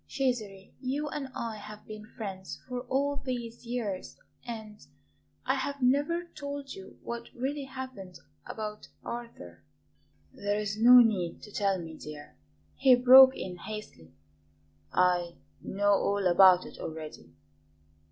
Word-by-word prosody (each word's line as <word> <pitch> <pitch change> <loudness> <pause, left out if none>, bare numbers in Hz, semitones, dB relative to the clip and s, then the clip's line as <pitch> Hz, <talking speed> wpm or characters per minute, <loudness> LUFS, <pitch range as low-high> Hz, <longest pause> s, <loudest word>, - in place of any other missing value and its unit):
"Cesare, 215 -8 -2
you 285 +3 -2
and 285 -2 -4
I 230 -2 -4
have 210 0 -11
been 215 0 -9
friends 195 -5 -7
for 250 -1 -3
all 280 +2 +1
these 240 -3 -5
years, 220 -6 -4 0.3
and 220 -3 -8 0.6
I - - +2
have 280 0 -3
never 290 +7 +2
told 285 -1 -6
you 190 0 -12
what 235 0 -6
really 275 +3 -3
happened 260 -9 -8 0.3
about 210 -1 -6 0.2
Arthur." 160 - -8 0.7
"There 205 0 -1
is 210 -1 -2
no 245 +3 +9
need 195 -7 0
to 210 - -11
tell 200 -2 +1
me, 165 -2 -8
dear," 150 - -10 0.4
he 260 -2 +6
broke 260 +1 +9
in 180 -1 -6
hastily; 210 - -9 0.8
"I 175 -1 +2 0.3
know 205 +1 +1
all 200 0 +1
about 185 0 +6
it - - -11
already." 155 - -8
215 Hz, 130 wpm, -29 LUFS, 190-255 Hz, 0.8 s, no